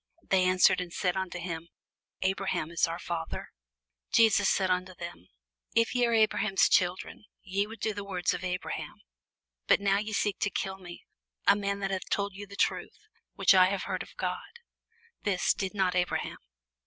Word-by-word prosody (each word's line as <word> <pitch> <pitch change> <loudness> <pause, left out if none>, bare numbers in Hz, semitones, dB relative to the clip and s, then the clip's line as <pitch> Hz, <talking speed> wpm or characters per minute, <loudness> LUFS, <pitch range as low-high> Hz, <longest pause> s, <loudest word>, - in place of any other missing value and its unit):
They 185 -1 +2
answered 185 0 +4
and 175 -1 -6
said 180 0 0
unto 190 -1 -3
him, 170 -1 -5 0.5
Abraham 190 -4 -1
is 170 - +2
our 165 0 -4
father. 170 -2 -5 0.6
Jesus 215 -3 +5
saith 190 -2 +2
unto 180 0 -1
them, 170 - -9 0.5
If 230 0 +3
ye 245 -1 +3
were 235 - +2
Abraham's 215 -2 +3
children, 180 +3 0 0.2
ye 200 +1 -1
would 225 +1 -10
do 220 - -1
the 205 0 -5
works 185 -3 -1
of 180 0 -5
Abraham. 180 0 -4 0.7
But - - +5
now 200 0 +2
ye 215 +1 -4
seek 205 -1 0
to 205 - +1
kill 190 -1 -3
me, 175 -2 -11 0.4
a - - +6
man 200 0 -2
that 195 0 -1
hath 190 -1 -3
told 200 -1 -1
you 200 +1 -8
the 200 - -10
truth, - - -1 0.4
which 195 -1 +5
I 185 -1 +7
have 195 0 -2
heard - - -3
of - - -10
God: 475 - -4 0.6
this 195 -3 +2
did 190 +1 -4
not 190 -2 +2
Abraham. 180 0 -1
190 Hz, 180 wpm, -29 LUFS, 180-200 Hz, 0.7 s, I